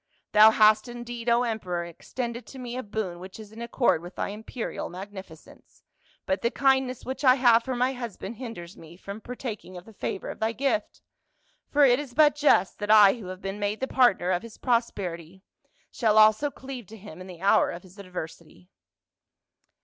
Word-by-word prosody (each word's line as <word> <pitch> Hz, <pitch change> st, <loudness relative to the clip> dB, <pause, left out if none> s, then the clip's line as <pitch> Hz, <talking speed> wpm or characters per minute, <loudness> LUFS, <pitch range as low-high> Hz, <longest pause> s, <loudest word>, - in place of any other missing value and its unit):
" -, -, -49 dB
Thou 215 Hz, +1 st, +9 dB
hast 215 Hz, 0 st, +4 dB
indeed, 240 Hz, 0 st, -5 dB
O 235 Hz, +1 st, +4 dB
emperor, 185 Hz, -7 st, -3 dB
extended 235 Hz, +8 st, -6 dB
to 270 Hz, -, -11 dB
me 245 Hz, -1 st, -6 dB
a 255 Hz, -, -3 dB
boon 200 Hz, -6 st, -4 dB
which 185 Hz, +3 st, -10 dB
is 215 Hz, -1 st, -11 dB
in 225 Hz, +1 st, -10 dB
accord 235 Hz, -7 st, +1 dB
with 175 Hz, +2 st, -11 dB
thy -, -, -3 dB
imperial 220 Hz, +3 st, -6 dB
magnificence, 190 Hz, -3 st, -12 dB, 0.4 s
but 190 Hz, -, -1 dB
the 235 Hz, -, +1 dB
kindness 265 Hz, -1 st, +1 dB
which 265 Hz, +3 st, -5 dB
I 255 Hz, -2 st, +7 dB
have 240 Hz, -3 st, +5 dB
for 260 Hz, +1 st, -3 dB
my 250 Hz, +2 st, +1 dB
husband 235 Hz, -3 st, -7 dB
hinders 215 Hz, -9 st, -8 dB
me 165 Hz, +1 st, -14 dB
from 200 Hz, +3 st, -8 dB
partaking 220 Hz, -6 st, -7 dB
of 175 Hz, -, -11 dB
the 225 Hz, -, -15 dB
favor 195 Hz, -, -4 dB
of -, -, -11 dB
thy 220 Hz, +1 st, 0 dB
gift; 275 Hz, +7 st, -2 dB, 0.7 s
for 290 Hz, 0 st, +5 dB
it 250 Hz, 0 st, +4 dB
is 275 Hz, -5 st, -8 dB
but 300 Hz, 0 st, +6 dB
just 290 Hz, -10 st, +2 dB
that 205 Hz, 0 st, -4 dB
I 210 Hz, -2 st, +8 dB
who 225 Hz, -6 st, -9 dB
have 185 Hz, +1 st, -8 dB
been 195 Hz, +1 st, -4 dB
made 205 Hz, +1 st, -2 dB
the 265 Hz, -, -2 dB
partner 220 Hz, -10 st, +3 dB
of 180 Hz, -1 st, 0 dB
his 230 Hz, -2 st, -12 dB
prosperity, 190 Hz, -7 st, -2 dB, 0.5 s
shall 220 Hz, -3 st, +1 dB
also 215 Hz, +7 st, +5 dB
cleave 260 Hz, -5 st, -9 dB
to 220 Hz, -, -12 dB
him 185 Hz, -4 st, -11 dB
in 185 Hz, -, -9 dB
the 180 Hz, -1 st, -11 dB
hour 200 Hz, -, +4 dB
of 170 Hz, -, -7 dB
his 185 Hz, +2 st, -17 dB
adversity." 165 Hz, -, -9 dB
220 Hz, 195 wpm, -26 LUFS, 190-245 Hz, 0.7 s, Thou